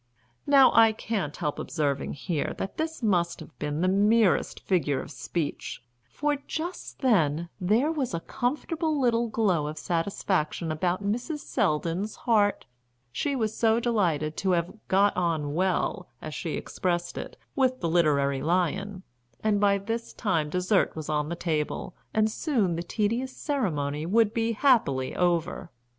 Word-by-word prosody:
Now 275 -2 +7
I 225 -1 +6
can't 205 -9 -3
help 150 - -2
observing 140 -3 -1
here 150 +1 -2
that 195 - -5
this 320 -4 -3
must 175 -5 +1
have - - -12
been 150 +1 -2
the 185 - +3
merest 205 +1 +3
figure 155 -7 +1
of - - -7
speech, 160 -5 -4 0.3
for 295 - 0
just 345 +3 -5
then 170 - +2
there 220 - +2
was 270 - -2
a - - -1
comfortable 300 - -1
little 240 -2 +2
glow 195 -9 +1
of 155 +1 -5
satisfaction 165 -1 -1
about 175 +5 -1
Mrs. 245 +9 -2
Selldon's 185 - -1
heart. 210 -4 +2 0.5
She 280 - -1
was 220 -4 -1
so 225 0 +3
delighted 170 -11 0
to 190 -2 +1
have 170 0 0
"got 200 +2 +3
on 160 -5 0
well," 185 +3 0
as - - -7
she - - -4
expressed 175 -1 -2
it, - - -7 0.2
with 255 -3 +2
the 170 - -1
literary 145 -5 +2
lion, 185 +4 0 0.4
and 215 -2 +2
by 200 -1 +4
this 225 +4 -4
time 165 -8 0
dessert 180 +4 +1
was 155 -1 -6
on 150 0 0
the 170 - -2
table, 165 +1 -2 0.2
and 215 -1 +3
soon 220 - 0
the 170 - -2
tedious 230 +8 -1
ceremony 155 - -1
would 220 +2 +3
be 230 0 0
happily 210 - +2
over. 175 0 0
190 Hz, 150 wpm, -27 LUFS, 165-230 Hz, 0.5 s, Now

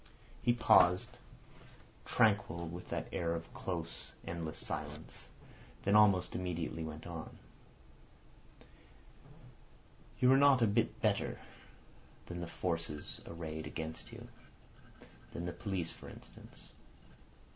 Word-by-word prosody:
He 120 - +4
paused, 90 -6 +5 0.9
tranquil, 100 -6 +3
with 85 +2 -7
that - - -2
air 85 0 0
of 85 0 -7
close, 85 -3 -5
endless 85 -2 -4
silence, - - -6 0.6
then 100 - +3
almost 100 -4 +6
immediately 85 -3 -2
went 80 0 -6
on. 85 -2 -7 2.8
"You 125 -1 +6
are - - +7
not 140 -3 +6
a - - +7
bit 100 - +1
better - - +1 0.9
than 85 - -6
the 85 - -4
forces 85 -3 -3
arrayed 80 -2 -5
against 80 0 -6
you—than 85 - -12
the 90 - -3
police, 95 -5 -2
for - - -11
instance. - - -14
85 Hz, 105 wpm, -35 LUFS, 80-100 Hz, 2.8 s, are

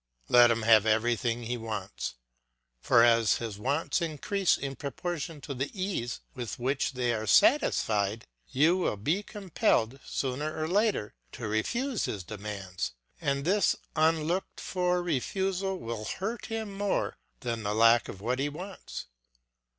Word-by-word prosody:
Let 120 -1 +8
him 115 -1 +1
have 110 -1 +6
everything 115 +1 +1
he 120 +2 -2
wants; 110 - -5 0.6
for 115 - +5
as 115 -2 +5
his 110 -4 -5
wants 140 - 0
increase 170 +4 +1
in 135 -1 -4
proportion 160 +1 -4
to 140 - -5
the 135 +2 -2
ease 185 -11 -2
with 120 -6 -5
which 135 +3 0
they 125 -2 0
are 110 -1 -3
satisfied, 105 - +3 0.2
you 155 +7 +3
will 175 - 0
be 155 - 0
compelled, 190 - 0
sooner 145 +4 -3
or 155 - -1
later, 200 - +1 0.2
to - - -5
refuse 235 - -1
his 100 -3 -4
demands, 100 -2 -5 0.3
and 140 0 0
this 200 +4 +3 0.2
unlooked 160 +3 +1
for 180 -1 0
refusal 190 +5 -1
will 115 -6 -5
hurt 210 - -4
him 220 -2 -4
more 200 0 -1 0.3
than 120 -3 -2
the 105 0 -1
lack 115 +1 +5
of 95 - -8
what 125 +4 -1
he 145 +2 0
wants. 180 - -7
135 Hz, 145 wpm, -29 LUFS, 115-180 Hz, 0.6 s, Let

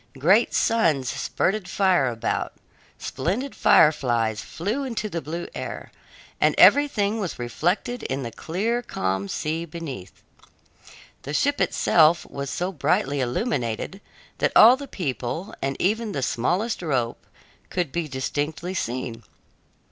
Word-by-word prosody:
Great 190 - +4
suns 160 - +2
spurted 190 +8 -1
fire 185 -9 +3
about, 115 -2 -2 0.4
splendid 200 - -3
fireflies 120 -8 +3
flew 210 +11 -3
into 230 -5 -3
the 170 -4 -3
blue 170 +3 -5
air, - - -6 0.5
and - - +3
everything 225 -7 +5
was 190 -6 -3
reflected 175 - -1
in 135 +1 -3
the 115 - -5
clear, 215 - -2
calm 95 - -2
sea 155 - -2
beneath. 150 - -8 1.0
The 145 +2 -5
ship 285 - +1
itself 160 0 +4
was 140 0 -4
so 180 +5 -2
brightly 145 -4 0
illuminated 125 - -2 0.4
that - - +1
all 235 +4 +9
the 280 +1 -8
people, 160 - -4
and 135 0 -2
even 215 +2 0
the 135 - -2
smallest 180 - 0
rope, 130 -8 -1 0.5
could 175 -6 -2
be 170 0 -2
distinctly 150 +6 -3
seen. 125 -7 -3
165 Hz, 125 wpm, -24 LUFS, 130-205 Hz, 1.0 s, all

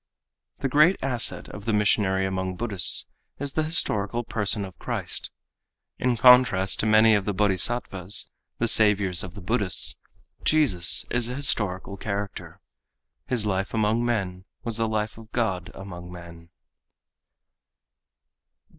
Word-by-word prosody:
_—The - - -1
great 150 +8 +4
asset 125 -4 +1
of 100 0 -10
the 115 - -1
missionary 100 -2 +1
among 95 -1 -3
Buddhists 100 -4 +3 0.3
is 140 0 -4
the 155 - 0
historical 120 -8 0
person 105 -2 -1
of 95 - -13
Christ. - - -3 0.7
In 125 -1 0
contrast 125 -6 +5
to 110 - 0
many 110 +1 +5
of 100 -2 +1
the 105 - -2
Bodhisattvas, 100 -1 0 0.3
the 120 - 0
saviours 100 -5 +3
of 90 +1 -7
the 100 - -9
Buddhists, 100 -1 -1 0.5
Jesus 100 - +3
is 120 -1 0
a 125 - -5
historical 100 -8 -1
character. 100 -1 -6 0.7
His 120 -4 -1
life 95 +1 -2
among 110 +2 +1
men 95 -6 -3 0.2
was 115 -2 -3
the 115 0 0
life 110 +1 -3
of 110 -1 -15
God 95 -7 -2
among 90 -2 -10
men. 85 -1 -12
105 Hz, 135 wpm, -25 LUFS, 95-120 Hz, 0.7 s, contrast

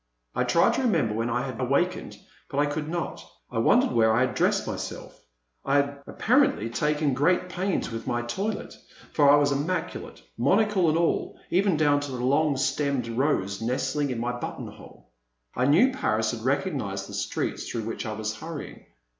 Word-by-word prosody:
I 125 - 0
tried 145 +7 +4
to - - 0
remember 165 - +1
when 115 +2 -1
I 125 +2 -1
had 130 -2 -5
awakened, 140 +8 0 0.3
but 140 - -5
I 145 - +4
could 150 +1 -3
not. 170 0 -4 0.3
I - - -1
wondered - - +4
where 110 -1 +4
I 120 - +3
had 130 -3 +1
dressed - - +1
myself; - - -6 0.4
I 140 - +1
had 140 0 +1
apparently 240 - +2
taken 150 +1 +1
great 180 +7 +2
pains 185 -5 -2
with 115 +1 -6
my 120 -1 -1
toilet, 195 - -3 0.4
for 145 -2 +5
I. 145 - +8
was 145 -1 +3
immaculate, 145 - -3 0.2
monocle 190 - +3
and 155 - +2
all, 170 0 0
even 190 -2 +3
down 145 -2 +3
to 145 -2 -5
a - - -3
long 140 +4 +2
stemmed' 135 -2 0
rose 115 -6 0
nestling 130 +4 -1
in 125 - -2
my 120 +1 -1
button 120 - -5
hole. - - -15 0.4
I 125 - +1
knew 190 - +5
Paris 110 - 0
and 110 -2 -6
recognized 130 - -1
the - - -10
streets - - -3
through 115 - -3
which 115 +1 -4
I 110 - -3
was 110 0 -3
hurrying. 160 +3 -8
140 Hz, 185 wpm, -26 LUFS, 120-160 Hz, 0.4 s, I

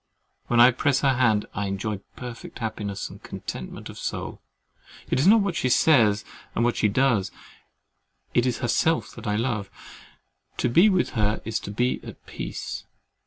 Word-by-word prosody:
When 120 - +2
I 120 +2 +9
press 135 +2 +1
her 135 -2 +3
hand, 115 -5 +2
I 100 -1 -2
enjoy 100 +2 -2 0.2
perfect 125 -2 -8
happiness 105 -4 -4
and - - -13
contentment 65 - -7
of - - -10
soul. - - -4 0.7
It - - +2
is 145 - +3
not 220 +2 +7
what 195 -4 -1
she 130 - 0
says 115 -8 +4 0.3
or 115 - +1
what 120 -1 +2
she - - +2
does—it 115 +1 -3
is 125 - 0
herself 160 +7 +1
that 115 -1 -8
I 105 - +1
love. 110 -3 -1 0.9
To - - +1
be 170 - +6
with 185 -3 +1
her 105 -1 0
is 110 0 -1
to - - -8
be 120 +4 0
at - - -11
peace. - - -6
120 Hz, 165 wpm, -25 LUFS, 105-130 Hz, 0.9 s, I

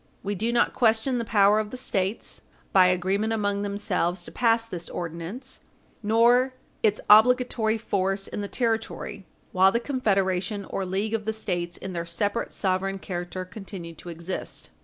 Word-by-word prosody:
We 200 +1 -2
do 220 +4 -1
not 235 0 +2
question 235 +2 +2
the - - -1
power 205 -1 +4
of 215 -1 -2
the 255 - -6
States, 200 -4 -2 0.3
by 185 -1 +7
agreement 190 +5 +1
among 205 -2 0
themselves, 200 -3 -1
to - - -11
pass 230 -2 +2
this 180 -6 -7
ordinance, 175 +10 -6 0.4
nor 240 +4 +4 0.3
its 215 -1 +2
obligatory 225 0 +5
force 195 -2 -1
in - - -5
the 200 - -3
territory 225 -4 -2 0.2
while 190 +1 +5
the 235 - +1
confederation 200 -6 0
or 190 0 -3
league 200 +4 -1
of 220 -2 -1
the 220 - -1
States 175 -5 -3
in 190 - -6
their 170 -1 -4
separate 205 +6 -1
sovereign 195 0 0
character 180 0 -5
continued 185 -4 -9
to 175 - -9
exist. 170 +2 -6
205 Hz, 160 wpm, -26 LUFS, 185-225 Hz, 0.4 s, by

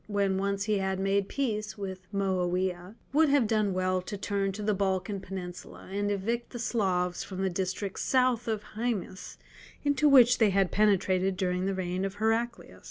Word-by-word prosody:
when 200 -2 +1
once 200 0 -1
he 210 -1 +1
had 190 0 -1
made 195 0 +1
peace 215 -7 -2
with 190 -2 -7
Moawiah, 185 -1 -1 0.2
would 310 +1 +4
have 280 -4 +4
done 215 -2 +1
well 185 0 0
to 205 +3 -6
turn 195 0 -1
to 210 +2 -6
the 210 0 +2
Balkan 195 +1 -1
Peninsula, 185 -2 -8
and 205 +1 -1
evict 225 +4 -2
the 245 - -7
Slavs 185 -7 0
from 190 -1 -5
the 190 - 0
districts 190 +2 -3
south 250 -2 +2
of 215 -2 -1
Haemus 215 -5 -3 0.5
into 285 +1 +3
which 250 -3 +7
they 220 -3 +5
had 195 -1 +2
penetrated 195 -2 +2
during 180 0 0
the 195 - -1
reign 185 0 -2
of 195 0 -3
Heraclius. 225 +2 -1
195 Hz, 175 wpm, -29 LUFS, 185-220 Hz, 0.5 s, which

